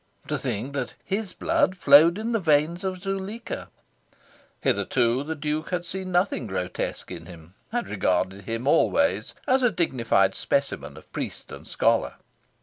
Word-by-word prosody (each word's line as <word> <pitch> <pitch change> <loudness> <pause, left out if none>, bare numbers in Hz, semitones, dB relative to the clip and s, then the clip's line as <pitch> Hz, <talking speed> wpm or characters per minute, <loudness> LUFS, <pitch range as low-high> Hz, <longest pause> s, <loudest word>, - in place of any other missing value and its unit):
To - - 0
think 125 +7 -3
that 135 -3 -3
his 200 0 -2
blood 185 - +1
flowed 160 +3 +7
in 225 +2 -2
the 225 - +2
veins 160 +1 +2
of 185 -1 -2
Zuleika! 195 +4 -4 0.9
Hitherto 125 0 +1
the 160 +2 -4
Duke 155 +1 -3
had 180 -1 -2
seen 185 +1 -5
nothing 175 - +1
grotesque 95 -2 -4
in 80 -1 -8
him 85 -1 -13 0.2
had 240 0 -1
regarded 95 0 0
him 115 +3 -3
always 280 - +2
as 265 -1 +3
a 245 - +5
dignified 115 - +2
specimen - - -2
of - - -15
priest - - -5
and - - -10
scholar. - - +1
160 Hz, 150 wpm, -25 LUFS, 115-190 Hz, 0.9 s, flowed